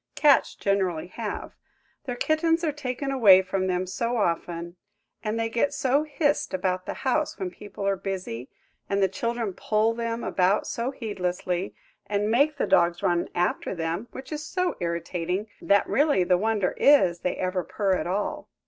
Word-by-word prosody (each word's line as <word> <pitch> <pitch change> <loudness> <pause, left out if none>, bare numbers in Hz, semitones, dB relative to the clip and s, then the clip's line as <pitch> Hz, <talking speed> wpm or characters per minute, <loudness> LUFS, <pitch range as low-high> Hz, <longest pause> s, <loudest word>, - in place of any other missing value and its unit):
Cats 290 -2 +4
generally 185 -5 0
have. 215 +1 -5 0.5
Their 250 -3 -3
kittens 325 +5 +1
are 315 - +1
taken 275 -1 -4
away 200 -8 +7
from 190 0 -1
them 180 0 0
so 235 +6 -2
often, 170 -3 -2 0.5
and 220 +1 -1
they 225 - +1
get 235 +5 0
so 270 +2 +2
hissed 295 - 0
about 185 0 -1
the - - -3
house 295 +4 +1
when 185 -2 -3
people 205 +1 -8
are 200 - +2
busy, 185 - -5 0.4
and 200 - +1
the - - +5
children 230 +2 -2
pull 215 +4 +1
them 230 0 -3
about 185 +2 +2
so 235 +2 -2
heedlessly, 190 -6 -3 0.3
and 205 +1 0
make 285 +5 +3
the - - +1
dogs 170 0 +3
run 175 -1 +1
after 180 +2 0
them–which 180 - -5
is 305 0 -4
so 365 +4 -1
irritating– 175 +3 -2
that 200 0 +3
really 285 -9 +3
the 180 +1 +3
wonder 210 0 0
is 185 -12 +5
they 180 - -1
ever 185 0 -1
purr 195 0 0
at 185 - -1
all. 195 +3 -2
200 Hz, 165 wpm, -26 LUFS, 180-245 Hz, 0.5 s, away